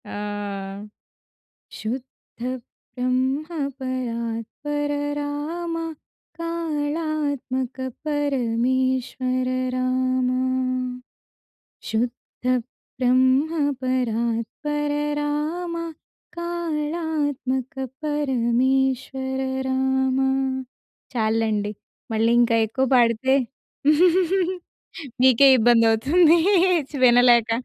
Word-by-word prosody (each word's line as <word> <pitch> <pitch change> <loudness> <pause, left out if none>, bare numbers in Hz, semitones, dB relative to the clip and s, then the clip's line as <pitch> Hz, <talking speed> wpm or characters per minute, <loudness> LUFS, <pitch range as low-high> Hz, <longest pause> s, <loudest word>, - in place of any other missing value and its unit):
ఆ! - - -8 1.7
శుద్ధ 245 +4 -7 0.6
బ్రహ్మ 255 +3 0 0.3
పరాత్పర 255 +3 -3 0.3
రామ 305 +4 -3 0.6
కాళాత్మక 300 -5 -2 0.3
పరమేశ్వర 255 -2 0 0.3
రామా! 255 0 +1 1.5
శుద్ధ 235 +3 -3 0.5
బ్రహ్మ 260 +4 +3 0.3
పరాత్పర 255 +4 -1 0.3
రామ 305 +4 -2 0.6
కాళాత్మక 305 -6 -2 0.3
పరమేశ్వర 265 -1 0 0.3
రామా. 265 0 +1 0.9
చాలులేండి 220 -2 0 0.4
మళ్ళీ 225 +1 +2
ఇంకా 235 -1 +3
ఎక్కువ 260 +5 0
పాడితే, 240 +2 +3 1.9
మీకే 260 +1 +7
ఇబ్బంది 230 0 +5
అవుతుంది 315 +9 +4 0.5
చ్ - - -19
వినలేక. 240 -1 +6
260 Hz, 55 wpm, -23 LUFS, 245-295 Hz, 1.9 s, మీకే